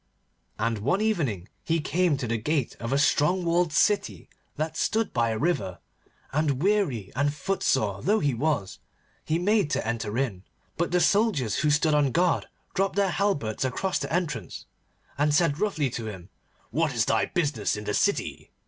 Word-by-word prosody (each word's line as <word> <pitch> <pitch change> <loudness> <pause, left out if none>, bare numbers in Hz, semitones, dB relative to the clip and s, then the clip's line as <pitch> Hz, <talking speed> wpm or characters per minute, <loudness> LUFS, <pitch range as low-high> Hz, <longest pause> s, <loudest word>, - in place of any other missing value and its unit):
And 115 0 -1
one 140 - +1
evening 145 - -1 0.2
he 165 0 +1
came 165 0 +1
to 130 - -3
the 115 0 -1
gate 145 +2 -1
of 115 - -4
a 135 - +2
strong 155 +5 +2
walled 170 0 +2
city 150 - +1 0.3
that 155 +2 -2
stood 225 -1 0
by 115 -1 +2
a 110 - -1
river, 145 - -1 0.6
and, 145 -1 0
weary 185 - +1
and 145 +2 +2
footsore 135 - 0
though 210 +3 +2
he 145 -2 +1
was, 120 -6 -1 0.4
he 160 - 0
made 200 -1 +2
to - - -1
enter 110 -1 -2
in. 115 -9 -2 0.3
But 170 +1 0
the 180 0 +2
soldiers 195 - +2
who 150 - +2
stood 150 +1 +3
on 145 -3 +3
guard 175 +3 +1 0.3
dropped 195 0 0
their 200 -2 +2
halberts 150 - 0
across 185 +9 -1
the - - -4
entrance, 175 -2 -3 0.5
and 145 0 +3
said 160 -3 +2
roughly 155 - 0
to 115 -1 -5
him, 95 -3 -8 0.4
'What 155 -4 0
is 110 -2 +2
thy 110 - +2
business 145 - 0
in 105 - -6
the 105 - -2
city? - - 0
150 Hz, 175 wpm, -26 LUFS, 115-175 Hz, 0.6 s, stood